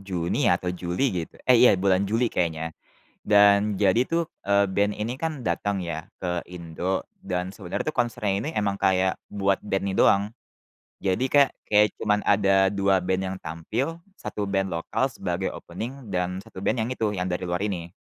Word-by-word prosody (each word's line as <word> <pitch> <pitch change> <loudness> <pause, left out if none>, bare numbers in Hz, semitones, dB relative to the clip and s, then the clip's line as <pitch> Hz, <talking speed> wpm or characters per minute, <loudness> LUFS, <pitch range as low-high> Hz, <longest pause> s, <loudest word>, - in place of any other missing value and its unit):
Juni 90 +7 -1
atau 90 -1 +1
Juli 90 +7 -2 0.2
gitu. 80 - -9
Eh 125 - +8
iya 125 -6 +7
bulan 95 +1 +2
Juli 115 +2 +1
kayaknya, 80 -1 -1 0.5
dan 100 0 +5
jadi 100 +3 +4
tuh, 170 0 +1 0.3
eee, 100 0 +5
band 100 +2 +1
ini 110 +3 -2
kan 155 -6 -3
datang 100 +3 0
ya 80 -1 -5
ke 90 -2 -1
Indo, 90 +1 -3 0.2
dan 90 +1 -3
sebenarnya 90 -4 -4
tuh - - -23
konsernya 110 -4 -1
ini - - -2
emang 100 -1 0
kayak 95 0 +2
buat 100 -1 +1
band 95 -1 -1
ini 95 - -2
doang. 100 0 +5 0.8
Jadi 95 +6 +1
kayak 140 -1 +6 0.2
kayak 105 0 +5
cuman 105 -1 +1
ada 100 -1 +4
2 100 -1 +2
band 95 +1 0
yang - - -7
tampil, 110 - -3 0.4
1 105 - -1
band 95 0 +1
lokal 85 +10 -1
sebagai 95 -3 -3
opening 115 +7 -7
dan 90 +1 -1
1 - - -13
band 125 - +1
yang 115 - -3
itu, 110 -3 0
yang 90 -1 -2
dari 90 +1 -2
luar 90 +3 -1
ini. 85 -4 -4
95 Hz, 180 wpm, -25 LUFS, 90-105 Hz, 0.8 s, Eh